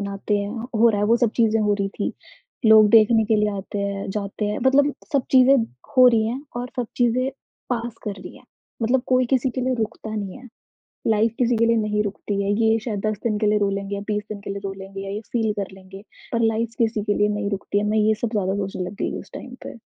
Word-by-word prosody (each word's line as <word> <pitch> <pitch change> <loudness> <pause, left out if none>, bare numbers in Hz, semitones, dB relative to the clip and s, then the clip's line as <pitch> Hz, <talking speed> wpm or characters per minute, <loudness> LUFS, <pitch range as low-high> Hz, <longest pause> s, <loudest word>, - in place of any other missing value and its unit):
बनाते 200 +1 -2
हैं 200 0 -3 0.3
हो 235 +2 +6
रहा 205 -3 +1
है, 205 - +2
वो 230 - +4
सब 240 -2 +2
चीज़ें 225 -2 +3
हो 210 -1 +2
रही 195 - 0
थी। - - -1 0.5
लोग 220 -1 +8
देखने 225 0 +6
के 220 0 +2
लिए 210 0 +2
आते 195 +1 -5
हैं, 200 0 -3
जाते 200 +1 -3
हैं 210 0 -1
मतलब 280 +2 +4 0.2
सब 280 - +3
चीज़ें 260 +1 +6 0.4
हो 255 -1 +8
रही 225 -2 +2
हैं 250 +4 -3 0.2
और 245 +1 -3
सब 245 -2 -1
चीज़ें 250 +2 +2 0.4
पास 235 -1 -2
कर 210 - -2
रही - - -10
हैं, - - -18 0.4
मतलब 245 +3 +2
कोई 255 -1 +3
किसी 260 0 +2
के 255 - -4
लिए 255 0 0
रुकता 220 0 -4
नहीं 200 -1 -4
है, 255 0 -13 0.6
लाइफ़ 220 0 +3
किसी 245 -1 +2
के 230 - +3
लिए 230 0 +3
नहीं 210 -1 0
रुकती 200 0 -3
है। 200 - 0
ये 225 0 +4
शायद 210 -5 -2
10 215 -1 -1
दिन 215 -3 0
के 215 - +1
लिए 210 0 +3
रो 200 -1 +2
लेंगे 200 0 -3
या 200 - -4
20 210 -1 -1
दिन 205 - -5
के 200 - -8
लिए 200 - -3
रो 195 - -3
लेंगे 195 0 -8
या 195 - -6
ये 210 - -4
फ़ील 225 -3 +1
कर 195 - -2
लेंगे, 190 0 -12 0.3
पर 235 - +1
लाइफ़ 230 +1 -2
किसी 225 -2 +1
के 205 0 +1
लिए 205 - +3
नहीं 205 -1 -2
रुकती 200 0 -2
है। - - -1
मैं 215 - +1
ये 215 0 +4
सब 240 - +1
ज़्यादा 195 -2 0
सोचने 195 -2 -3
लग - - -10
गई - - -2
उस - - -13
टाइम 250 - -8
पे। - - -8
215 Hz, 255 wpm, -23 LUFS, 200-235 Hz, 0.6 s, लोग